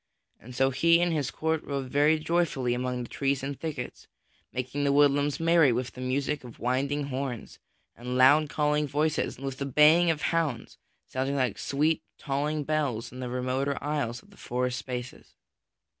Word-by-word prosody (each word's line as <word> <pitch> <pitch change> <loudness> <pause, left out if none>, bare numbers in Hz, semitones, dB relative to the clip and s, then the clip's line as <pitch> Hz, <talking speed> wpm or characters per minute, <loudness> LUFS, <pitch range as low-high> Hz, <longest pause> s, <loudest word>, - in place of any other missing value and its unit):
So 135 +2 +1
he 170 +6 +4
and 175 -1 +1
his 145 -4 -1
court 160 +2 -1
rode 135 -2 -4
very 150 +2 +4
joyfully 155 -6 0
amid 125 0 -2
the - - -10
trees 135 -1 -1
and 140 0 -4
thickets, 150 -6 -6 0.4
making 130 +3 -3
the 140 - +2
woodlands 145 0 +3
merry 165 -4 +4
with 125 +1 -2
the 125 - -10
music 135 +3 -1
of 120 -2 -11
winding 140 +3 -1
horns 130 -3 -5 0.4
and 125 +1 -4
loud 145 +4 +6
calling 150 0 +1
voices 150 +3 0
and 135 - -8
with 135 -1 -5
the 140 - -2
baying 155 +5 +5
of 155 -2 0
hounds 150 -9 -2 0.3
sounding 135 +2 -2
like 130 -6 0
sweet 150 +3 +1 0.2
tolling 150 +2 -2
bells 135 -6 -1
in 130 - -10
the 125 -1 -4
remoter 130 +3 -1
aisles 145 -6 -2
of - - -22
the - - -19
forest 125 +1 -2
spaces. 125 -1 -7
140 Hz, 175 wpm, -28 LUFS, 125-150 Hz, 0.4 s, loud